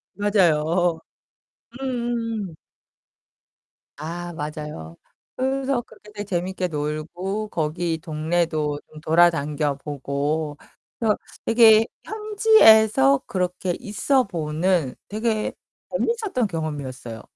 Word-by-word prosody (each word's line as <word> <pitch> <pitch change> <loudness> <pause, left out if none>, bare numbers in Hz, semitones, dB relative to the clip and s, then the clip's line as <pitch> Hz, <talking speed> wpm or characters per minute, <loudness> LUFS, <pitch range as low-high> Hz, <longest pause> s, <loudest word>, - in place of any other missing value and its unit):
맞아요. 175 -4 +2 0.8
음음음. 235 -7 -3 1.4
아, 170 +3 -5
맞아요. 150 - -6 0.4
그래서 265 -1 0
그렇게 210 -2 -17
되게 205 -1 -5
재밌게 185 0 -2
놀고 165 +7 -3
거기 165 0 -1
동네도 155 -1 -1
좀 155 0 -13
돌아당겨 155 -3 +2
보고 145 +2 -3 0.4
그래서 220 -3 +2 0.3
되게 225 -1 +7 0.2
현지에서 225 - +5
그렇게 180 -1 -1
있어 255 +4 +1
보는 165 -3 -1
되게 215 +1 -1 0.4
재밌었던 440 - 0
경험이었어요. 140 - -5
175 Hz, 220 characters per minute, -23 LUFS, 150-220 Hz, 1.4 s, 되게